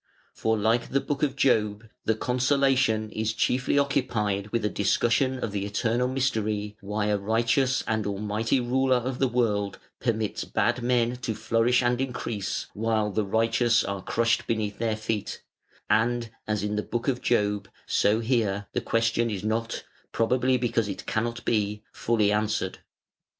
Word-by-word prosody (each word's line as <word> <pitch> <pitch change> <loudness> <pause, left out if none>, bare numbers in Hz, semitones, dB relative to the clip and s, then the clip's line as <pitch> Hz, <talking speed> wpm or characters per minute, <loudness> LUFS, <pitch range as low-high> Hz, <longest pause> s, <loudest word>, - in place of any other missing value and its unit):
For 110 0 0
like 110 +3 +1
the 140 - +2
Book 140 0 -3
of 140 -3 +1
Job, 110 -5 +1 0.2
the 110 - +2
"Consolation" 130 -2 +2
is 110 0 -1
chiefly 125 +4 +1
occupied 110 -8 0
with 110 0 -1
a - - +4
discussion 120 +6 +1
of 115 - -3
the 100 -1 -2
eternal 115 +4 0
mystery 110 -5 -1
why 105 +1 -2
a 105 -1 +1
Righteous 115 +6 +1
and 110 -3 0
Almighty 105 +5 0
Ruler 130 +2 +2
of 125 +1 -2
the 135 - +3
world 105 -5 0 0.2
permits 110 -3 -1
bad 120 +1 0
men 120 0 +1
to 115 -3 -3
flourish 120 +4 +2
and 120 +1 +1
increase, 115 -6 -3
while 110 -1 0
the 110 +2 0
righteous 115 +2 +2
are 100 -1 -3
crushed 115 +4 +1
beneath 105 -3 -2
their 115 -1 0
feet: 110 -1 -3 0.4
and, 115 +2 +1 0.2
as 105 -2 -1
in 105 0 -1
the - - +1
Book 120 +2 -4
of 125 -2 0
Job, 105 -4 +1 0.2
so 110 +3 +2
here, 110 -4 0
the - - 0
question 115 0 +1
is 100 -3 -4
not, 115 +1 -2 0.3
probably 125 +3 +2
because 115 -3 0
it 95 -2 -6
cannot 115 +1 -2
be, 105 -1 0
fully 110 -3 +1
answered. 105 -3 -1
115 Hz, 160 wpm, -26 LUFS, 105-125 Hz, 0.4 s, a